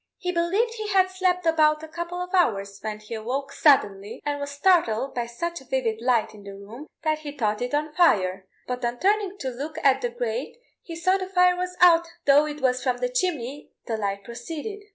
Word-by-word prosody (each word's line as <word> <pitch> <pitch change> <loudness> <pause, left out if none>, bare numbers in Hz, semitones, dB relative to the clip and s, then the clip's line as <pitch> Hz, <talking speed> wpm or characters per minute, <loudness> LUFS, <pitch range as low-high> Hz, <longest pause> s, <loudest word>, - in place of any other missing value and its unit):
He 360 - -2
believed 375 +7 +1
he 435 -2 -5
had 380 -2 +3
slept 365 -1 0
about 310 -1 +3
a - - -7
couple 345 +2 -5
of 360 +1 -10
hours 200 - +1
when 215 -1 -4
he 215 +2 -9
awoke 250 +5 -3
suddenly, 205 -8 +2
and 290 -1 -1
was 285 0 -4
startled 285 -5 +2
by 240 -1 -2
such 340 +8 -4
a - - -16
vivid 240 -4 -1
light 240 -2 +1
in 210 - -13
the 200 0 -9
room 220 +9 -11 0.2
that 310 -1 +1
he 300 -2 -7
thought 215 -3 0
it 245 +3 -1
on 300 +1 -2
fire, 190 - +2 0.2
but 250 0 -4
on 240 0 -1
turning 400 - +1
to 265 - -3
look 290 +6 -6
at 270 -1 +4
the 245 - -1
grate 240 - -4 0.2
he 335 - -8
saw 370 +3 +2
the 375 0 -5
fire 360 -1 +4
was 360 0 -4
out, 340 -1 +6 0.2
though 285 +2 +5
it 300 -1 -6
was 255 -1 +1
from 255 -2 0
the 250 0 -1
chimney 280 -1 -2 0.2
the 230 - -2
light 200 -2 -3
proceeded. 310 - -7
285 Hz, 215 wpm, -25 LUFS, 235-350 Hz, 0.2 s, out